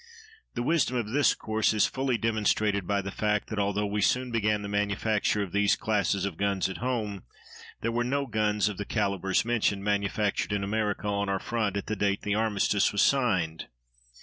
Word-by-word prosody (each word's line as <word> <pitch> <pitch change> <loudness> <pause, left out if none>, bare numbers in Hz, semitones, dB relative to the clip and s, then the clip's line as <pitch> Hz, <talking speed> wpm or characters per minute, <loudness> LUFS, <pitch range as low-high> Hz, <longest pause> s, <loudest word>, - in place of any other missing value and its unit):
The 120 - -1
wisdom 140 -3 +1
of 115 -3 -2
this 145 +5 +3
course 110 0 0
is 105 - +4
fully 130 -2 -1
demonstrated 105 -3 0
by 100 -1 0
the 100 - -5
fact 105 0 -1
that, 110 - -3
although 100 +1 0
we 105 +1 -1
soon 125 +4 +1
began 105 -2 0
the - - -4
manufacture 105 +1 0
of 95 - -7
these 100 +1 +3
classes 100 -4 0
of 95 -5 -4
guns 100 -1 0
at 95 - -6
home, 110 -6 -2 0.6
there 115 - -1
were 120 +1 0
no 140 +3 -1
guns 105 -3 +1
of 105 -3 -3
the 105 - -4
calibres 100 -3 0
mentioned 105 -4 0
manufactured 105 0 0
in 100 -1 -1
America 105 0 -1
on 100 -1 -1
our 100 - +1
front 105 -3 -1
at 100 - -4
the 110 - -2
date 100 0 0
the 105 - 0
armistice 105 -2 +1
was 100 - +2
signed. 95 -12 +1
105 Hz, 195 wpm, -28 LUFS, 100-110 Hz, 0.6 s, is